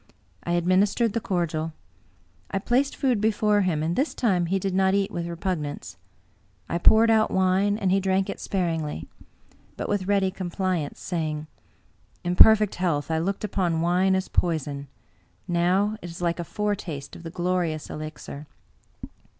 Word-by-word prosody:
I 170 - -1
administered 195 +6 +2
the 230 - 0
cordial. 165 -4 -2 0.8
I - - -2
placed 250 +7 +1
food 250 -6 +1
before 210 -1 +2
him, 165 -5 0
and 165 +2 -1
this 285 +4 0
time 185 -8 +1
he 195 +3 +1
did 195 0 -2
not 190 +1 +3
eat 200 -1 0
with 170 -1 -3
repugnance. 170 -4 -4 0.7
I 170 - -2
poured 225 +5 +6
out 220 -1 +4
wine, 190 +2 +2
and 195 -4 0
he 195 - +4
drank 190 0 +1
it - - -5
sparingly, 165 - -2 0.7
but - - -3
with 200 -2 -1
ready 195 -2 +2
compliance, 185 -4 -3
saying, 155 -3 -3 0.4
" - - -37
In 175 0 -1
perfect 215 +1 +7
health, 165 -4 0
I 160 - +1
looked 195 +5 -2
upon 180 -5 0
wine 180 +3 +3
as 190 0 -1
poison; 145 -5 -1 0.6
now 185 +5 +1
it 175 - -7
is 165 - -9
like 170 0 -1
a - - -1
foretaste 185 -7 -4
of - - -10
the 165 - -7
glorious 175 -3 -1
elixir." 155 -1 -8
185 Hz, 160 wpm, -25 LUFS, 165-200 Hz, 0.8 s, perfect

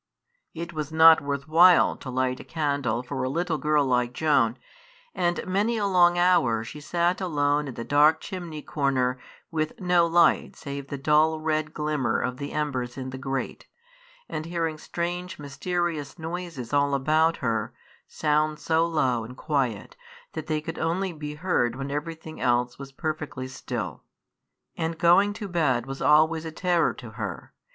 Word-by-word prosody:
It 170 +1 -6
was 155 -1 -4
not 160 0 +7
worth 140 0 -3
while 175 +3 +6
to 130 - -8
light 130 0 -1
a - - -8
candle 140 -7 -1
for 125 - -4
a 130 - -1
little 165 +2 -1
girl 150 0 +2
like 125 -1 +1
Joan, 135 -6 +2 0.6
and 175 0 -1
many 205 +5 0
a 205 - 0
long 175 -2 +4
hour 175 -11 +3
she 150 +6 -9
sat 175 +4 0
alone 145 -4 +1
in 130 - -7
the 115 - -5
dark 150 +4 +4
chimney 170 -5 -7
corner 130 -3 0 0.3
with 155 -1 -2
no 180 -2 +3
light 170 0 +3
save 140 -2 -7
the 140 - -5
dull 155 +3 +3
red 155 -1 -1
glimmer 150 -6 0
of 125 0 -2
the 140 +1 -5
embers 130 -5 -2
in 130 -1 -5
the 130 - -7
grate, 135 -1 -4 0.6
and 155 +1 -5
hearing 165 -2 -2
strange, 175 +2 -4
mysterious 150 +1 -3
noises 165 -7 -6
all 140 0 +3
about 155 +4 +2
her, 115 -2 -1 0.4
sounds 150 0 0
so 165 +1 +2
low 130 -8 +1
and 125 +3 -10
quiet 130 -9 -2 0.4
that 155 -1 -6
they 155 -1 -1
could 160 +1 -6
only 180 +3 -1
be 150 -1 -6
heard 150 -8 0
when 135 +1 -5
everything 160 +2 -5
else 125 0 +1
was 135 -1 -8
perfectly 150 -3 -4
still. 130 0 -5 0.7
And 165 0 -3
going 185 +5 +4
to 205 -1 -6
bed 150 -10 +1
was 135 0 -7
always 160 +1 +4
a 160 - -5
terror 175 0 +1
to 120 -3 -10
her. 105 -5 -6
150 Hz, 165 wpm, -26 LUFS, 135-165 Hz, 0.7 s, not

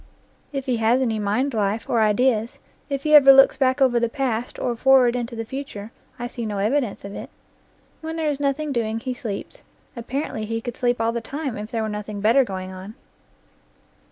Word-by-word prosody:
If 275 -2 -4
he 250 -3 0
has 225 +3 +3
any 230 -4 0
mind 220 +7 0
life, 210 0 -1
and 235 - 0
ideas, 225 +1 +2 0.3
if 275 -1 -3
he 305 - +1
ever 275 -2 +9
looks 270 0 +7
back 260 0 +1
over 240 -2 +3
the 235 0 0
past, 245 -3 -2
or 240 - -2
forward 255 0 +4
into 240 -1 -4
the 225 0 -4
future, 225 -4 -7 0.3
I 240 - -5
see 240 0 -6
no 210 -2 -3
evidence 215 +1 -1
of 200 - -7
it. - - -7 0.7
When 320 0 -5
there 315 -2 0
is 285 - -5
nothing 285 +1 -1
doing 225 -3 -1
he 255 +2 -4
sleeps; 230 -6 -7 0.3
apparently 240 -2 -4
he 225 +1 -3
could 240 0 -6
sleep 245 -1 0
all 225 0 +1
the 235 0 -3
time, 275 +1 -5
if 210 +1 -6
there 225 -1 -2
were - - -2
nothing 210 -1 -5
better 230 +7 +4
going 185 -4 -6
on. 190 +4 -9
235 Hz, 205 wpm, -23 LUFS, 220-270 Hz, 0.7 s, ever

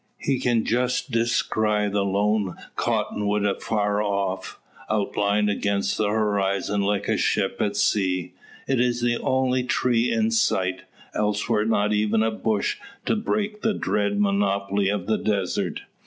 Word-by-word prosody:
He 135 -2 -1
can 120 -3 +1
just 125 +3 0
descry 110 -2 +1
the 100 0 0
lone 100 0 0 0.2
cottonwood 105 0 0
afar 105 +1 0
off, 100 -2 -2 0.3
outlined 105 0 +1
against 100 -1 0
the 105 - +2
horizon 100 -1 0
like 100 0 0
a 110 - +1
ship 95 -2 +1
at 100 -1 0
sea. 95 -4 +1 0.3
It 135 -3 +1
is 120 0 +1
the 120 0 +1
only 130 -1 +1
tree 120 -1 +1
in 225 0 +1
sight; 95 - +1 0.3
elsewhere 105 0 0
not 105 -1 +1
even 105 +1 +2
a 110 - +1
bush 110 -1 -1 0.3
to - - +2
break 210 -1 -2
the 220 -2 +1
drear 100 -1 0
monotony 100 -1 +1
of 100 -3 -2
the 110 - 0
desert. 100 -4 -1
105 Hz, 140 wpm, -24 LUFS, 100-115 Hz, 0.3 s, the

